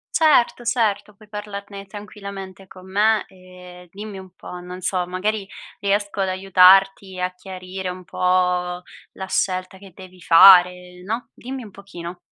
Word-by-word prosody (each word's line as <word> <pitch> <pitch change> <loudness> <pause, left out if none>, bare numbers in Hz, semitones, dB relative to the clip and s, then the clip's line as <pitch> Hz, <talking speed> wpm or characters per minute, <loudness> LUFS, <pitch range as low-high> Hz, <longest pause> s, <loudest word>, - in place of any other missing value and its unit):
Certo, 285 -6 +3
certo, 220 -4 -1
puoi 215 +1 -19
parlarne 200 -1 -8
tranquillamente 200 -2 -10
con 185 0 -14
me 215 +2 +2
e 180 -1 -15
dimmi 205 0 -8
un 190 0 -12
po', 180 - -9
non 180 +1 -9
so, 180 -1 -2
magari 195 +3 -2 0.3
riesco 200 0 -1
ad 190 - 0
aiutarti, 190 0 +4
a 180 0 -2
chiarire 185 0 -7
un 180 0 -8
po' - - -13 1.0
la 190 - -7
scelta 185 0 -2
che 195 -1 -14
devi 185 -1 -14
fare, 180 +1 +6
no, 225 +6 -4
dimmi 260 +1 -8
un 210 - -12
pochino. 180 -3 -10
190 Hz, 145 wpm, -21 LUFS, 185-205 Hz, 1.0 s, fare